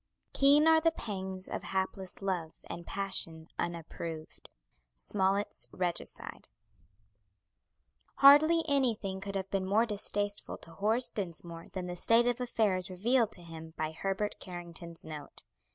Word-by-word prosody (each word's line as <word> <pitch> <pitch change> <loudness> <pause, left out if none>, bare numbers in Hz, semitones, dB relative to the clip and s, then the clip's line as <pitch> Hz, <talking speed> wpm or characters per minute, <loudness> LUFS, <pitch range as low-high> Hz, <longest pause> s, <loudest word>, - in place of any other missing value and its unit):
Keen 285 +3 +6
are 320 0 +6
the 330 - +5
pangs 190 -9 -5
Of - - -4
hapless 190 0 -3
love 175 -5 -2
and 170 0 -7
passion 170 -5 -3
unapproved. 165 -1 -5 0.5
SMOLLETT'S 190 - 0
"REGICIDE" 175 -2 -4 1.7
Hardly 310 +4 +8
anything 225 -9 +1
could 200 0 -5
have 195 0 -3
been 190 -1 0
more 215 +4 +4
distasteful 205 -1 -2
to 165 - -11
Horace 220 +7 +1
Dinsmore 170 -3 -5
than 185 -2 -3
the 180 0 -4
state 230 +6 +4
of 245 0 +1
affairs 210 -7 +1
revealed 225 +5 +2
to 175 - -2
him 160 -1 -10
by 155 0 -1
Herbert 195 +5 -2
Carrington's 170 -2 -7
note. 155 -2 -9
190 Hz, 130 wpm, -32 LUFS, 170-220 Hz, 1.7 s, Hardly